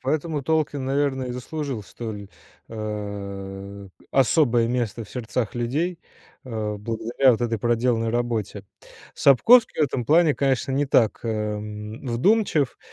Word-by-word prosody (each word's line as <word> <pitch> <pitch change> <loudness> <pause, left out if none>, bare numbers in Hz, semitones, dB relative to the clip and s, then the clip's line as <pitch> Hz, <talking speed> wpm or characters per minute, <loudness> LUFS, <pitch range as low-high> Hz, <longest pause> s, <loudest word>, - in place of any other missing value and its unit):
поэтому 150 +2 -1
Толкин, 150 -2 0
наверно, 135 -1 0
и 125 - -4
заслужил 130 -1 -4
столь, 105 -1 -7 0.4
а, 100 -2 -6 0.2
особое 125 -3 +3
место 120 -2 -2
в 105 - -17
сердцах 115 -2 -3
людей, 155 +9 -1 0.5
а, 110 -4 -3
благодаря 115 +5 +2
вот 115 - -2
этой 115 -2 -1
проделанной 115 0 +1
работе. 120 -3 -2 0.5
Сапковский 225 - +5
в - - +6
этом 125 -3 -3
плане, 155 +3 +4
конечно, 135 -1 0
не 140 +2 +1
так, 115 -5 +2
эм, 105 +1 -4
вдумчив, 150 - +1
120 Hz, 125 wpm, -24 LUFS, 110-140 Hz, 0.5 s, в